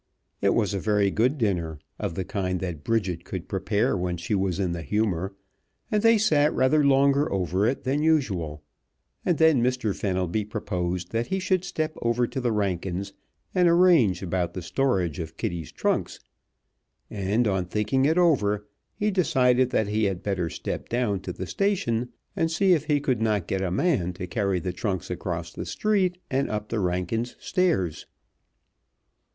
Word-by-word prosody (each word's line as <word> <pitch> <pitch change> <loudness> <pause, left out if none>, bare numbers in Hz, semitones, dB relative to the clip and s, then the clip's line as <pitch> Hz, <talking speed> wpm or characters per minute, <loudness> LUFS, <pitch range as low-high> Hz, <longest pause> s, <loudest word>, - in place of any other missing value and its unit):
It - - +3
was 105 -4 +1
a 100 - -1
very 105 -1 +2
good 125 +9 +1
dinner, 90 - -1 0.2
of 85 - -3
the 95 - -2
kind 90 -1 -2
that 85 -5 -5
Bridget 95 -7 -1
could 95 -2 -6
prepare 100 +2 0
when 90 -1 -2
she 85 +5 -3
was 95 -2 0
in 95 -3 0
the 85 -1 -3
humor, 95 +2 -1 0.6
and 210 - +2
they 230 0 +5
sat 155 -8 +3
rather 130 +4 +3
longer 140 +1 +3
over 95 +2 +1
it 130 - -1
than 135 +3 0
usual, 95 - 0 0.6
and 175 - +1
then 160 -6 +5
Mr. 125 -4 0
Fenelby 95 +1 -1
proposed 90 -4 -3
that 115 +1 -1
he 190 - -1
should 185 -1 +1
step 155 -3 -3
over 120 +1 +2
to 130 - -4
the 120 -1 +1
Rankins' 95 -2 -2 0.4
and 180 -1 +4
arrange 170 - +4
about 90 -1 -2
the 90 - -4
storage 90 - 0
of 80 -1 -6
Kitty's 85 -3 -4
trunks, - - -1 0.9
and 105 +4 0
on 95 -3 0
thinking 105 +8 0
it 160 +4 +2
over 105 - +2 0.3
he 210 +1 0
decided 130 -9 +3
that 110 -3 +1
he 105 +1 +1
had 95 -3 -2
better 95 -4 -1
step - - -5
down 120 -5 0
to 95 -1 -6
the 95 - -5
station 125 - 0 0.3
and 165 - +1
see 185 +3 +3
if 155 -3 +1
he 150 -2 +2
could 130 -6 0
not 105 -5 +1
get 95 +1 -2
a 95 - 0
man 95 - +1
to 90 - -6
carry 100 0 0
the 90 +1 -3
trunks 95 0 -3
across 85 -2 -4
the - - -6
street 195 -4 +1
and 135 +1 +1
up 105 0 -3
the 115 - -1
Rankins' 90 +6 -1
stairs. 160 - 0
105 Hz, 175 wpm, -26 LUFS, 90-135 Hz, 0.9 s, they